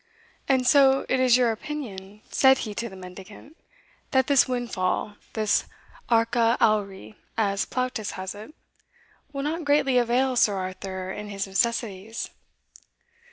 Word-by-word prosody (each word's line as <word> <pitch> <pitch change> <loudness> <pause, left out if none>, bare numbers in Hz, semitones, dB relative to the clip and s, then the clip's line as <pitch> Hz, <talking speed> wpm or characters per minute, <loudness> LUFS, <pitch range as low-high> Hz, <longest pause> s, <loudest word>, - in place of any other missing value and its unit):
"And 260 -2 +3
so 270 0 +5
it 260 - +2
is 255 -1 +5
your 245 -2 +3
opinion," 215 -6 -7
said 265 0 +5
he 210 - -5
to 235 +3 -4
the 190 - -12
mendicant, 190 - -12 0.5
"that 265 -2 +3
this 280 -2 +4
windfall 235 -6 -2 0.2
this 215 -2 +1 0.4
arca 230 0 +3
auri, 195 - 0 0.2
as 200 -3 +1
Plautus 255 -5 -3
has 185 0 -5
it, 215 +9 -11 0.8
will 275 -1 -4
not 325 +3 -2
greatly 285 -3 +3
avail 250 +2 +1
Sir 210 -4 +3
Arthur 185 0 -5
in 210 +1 -7
his 195 -1 -3
necessities?" 220 +1 -2
230 Hz, 135 wpm, -25 LUFS, 195-260 Hz, 0.8 s, so